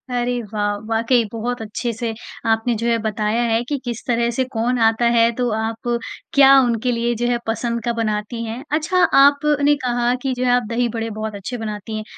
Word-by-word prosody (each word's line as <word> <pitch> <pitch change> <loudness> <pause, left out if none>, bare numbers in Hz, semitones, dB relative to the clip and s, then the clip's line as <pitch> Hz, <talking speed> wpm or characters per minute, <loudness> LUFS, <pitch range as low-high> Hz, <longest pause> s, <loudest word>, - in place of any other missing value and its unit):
अरे 245 0 -1
वाह! 205 -1 0
वाक़ई 230 +2 +2
बहुत 235 +1 -3
अच्छे 220 +3 -3
से 230 0 -3 0.4
आपने 225 +2 +1
जो 235 - 0
है 235 - +2
बताया 215 +2 0
है 230 0 +1
कि, 285 +3 -3
किस 240 -2 -5
तरह 235 -1 +1
से 260 +3 0
कौन 240 +2 0
आता 225 +1 +3
है 230 0 +4
तो 245 -1 0
आप 225 +2 -4 0.5
क्या 275 -1 +7
उनके 240 0 0
लिए 235 0 0
जो 240 - +1
है 240 -1 +1
पसंद 235 0 -2
का 235 - 0
बनाती 225 +1 -2
हैं। 230 +4 -6
अच्छा 320 +4 +2 0.2
आप 285 0 +5 0.2
ने 290 +1 +4
कहा 245 0 +1
कि 265 -1 -1
जो 250 - -1
है 250 - +3
आप 245 0 +3
दही 240 +1 +1
बड़े 225 0 -3
बहुत 215 -1 -4
अच्छे 200 +5 -5
बनाती 215 -1 -5
हैं 215 - -4
235 Hz, 210 wpm, -20 LUFS, 225-245 Hz, 0.5 s, क्या